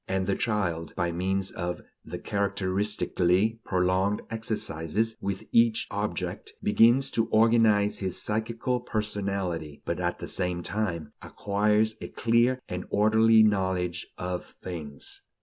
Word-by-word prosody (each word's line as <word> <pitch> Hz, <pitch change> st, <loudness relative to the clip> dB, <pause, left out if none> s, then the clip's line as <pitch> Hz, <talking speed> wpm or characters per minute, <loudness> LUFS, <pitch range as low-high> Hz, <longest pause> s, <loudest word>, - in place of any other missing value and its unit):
and 95 Hz, 0 st, 0 dB
the 100 Hz, -, 0 dB
child, 90 Hz, -8 st, -2 dB
by 85 Hz, -1 st, 0 dB
means 95 Hz, +3 st, -1 dB
of 90 Hz, 0 st, -4 dB, 0.2 s
the -, -, -6 dB
characteristically 100 Hz, +1 st, 0 dB
prolonged 95 Hz, +2 st, +1 dB
exercises 110 Hz, -2 st, -1 dB
with 100 Hz, -1 st, -3 dB
each 115 Hz, -1 st, +4 dB
object, 105 Hz, +1 st, -3 dB
begins 120 Hz, +6 st, +4 dB
to 115 Hz, -1 st, +1 dB
organize 110 Hz, -2 st, +4 dB
his 95 Hz, -2 st, -1 dB
psychical 115 Hz, +3 st, -1 dB
personality, 100 Hz, -9 st, -3 dB
but 85 Hz, -, -2 dB
at 90 Hz, -1 st, -1 dB
the -, -, -7 dB
same 90 Hz, -1 st, -2 dB
time 85 Hz, -8 st, -3 dB
acquires 105 Hz, +2 st, 0 dB
a -, -, -5 dB
clear 120 Hz, +3 st, +2 dB
and 90 Hz, 0 st, -4 dB
orderly 110 Hz, +1 st, +5 dB
knowledge 95 Hz, -4 st, 0 dB
of 90 Hz, 0 st, -3 dB
things. 75 Hz, -6 st, -8 dB
100 Hz, 125 wpm, -27 LUFS, 90-110 Hz, 0.2 s, orderly